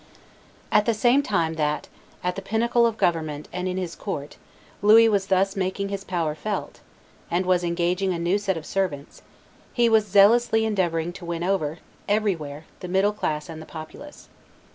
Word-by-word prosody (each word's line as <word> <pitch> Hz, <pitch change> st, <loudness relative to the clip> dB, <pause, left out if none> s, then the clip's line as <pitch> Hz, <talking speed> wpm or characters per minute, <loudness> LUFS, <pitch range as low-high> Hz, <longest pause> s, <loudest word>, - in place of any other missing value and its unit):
At 210 Hz, 0 st, +3 dB
the 230 Hz, -, +2 dB
same 245 Hz, +5 st, +4 dB
time 170 Hz, -, 0 dB
that 150 Hz, -1 st, -1 dB, 0.4 s
at 180 Hz, 0 st, -1 dB
the 195 Hz, -, -5 dB
pinnacle 235 Hz, +4 st, +2 dB
of 225 Hz, -1 st, -3 dB
government 155 Hz, -5 st, -1 dB
and 180 Hz, +1 st, -3 dB
in 185 Hz, 0 st, -2 dB
his 180 Hz, -3 st, -3 dB
court 145 Hz, -8 st, -6 dB, 0.4 s
Louis 220 Hz, +2 st, +7 dB
was 200 Hz, -3 st, +1 dB
thus 195 Hz, 0 st, +2 dB
making 195 Hz, +1 st, -2 dB
his 200 Hz, -1 st, -4 dB
power 170 Hz, -5 st, -1 dB
felt, 205 Hz, +7 st, -5 dB, 0.5 s
and 180 Hz, +2 st, 0 dB
was 180 Hz, -1 st, +2 dB
engaging 175 Hz, +2 st, 0 dB
a 175 Hz, -, -1 dB
new 175 Hz, +4 st, +1 dB
set 195 Hz, -3 st, -1 dB
of 160 Hz, -, -7 dB
servants, 175 Hz, -7 st, -3 dB, 0.5 s
he 240 Hz, -1 st, +3 dB
was 220 Hz, -2 st, +3 dB
zealously 220 Hz, +3 st, +5 dB
endeavoring 175 Hz, -5 st, 0 dB
to 180 Hz, -1 st, -10 dB
win 170 Hz, 0 st, -3 dB
over, 175 Hz, -5 st, -1 dB, 0.3 s
everywhere, 165 Hz, -8 st, -1 dB
the 180 Hz, -, -7 dB
middle 190 Hz, +3 st, +2 dB
classes 155 Hz, -7 st, -3 dB
and 160 Hz, -1 st, -8 dB
the 160 Hz, -, -11 dB
populace. 165 Hz, -, -10 dB
185 Hz, 175 wpm, -24 LUFS, 165-210 Hz, 0.5 s, Louis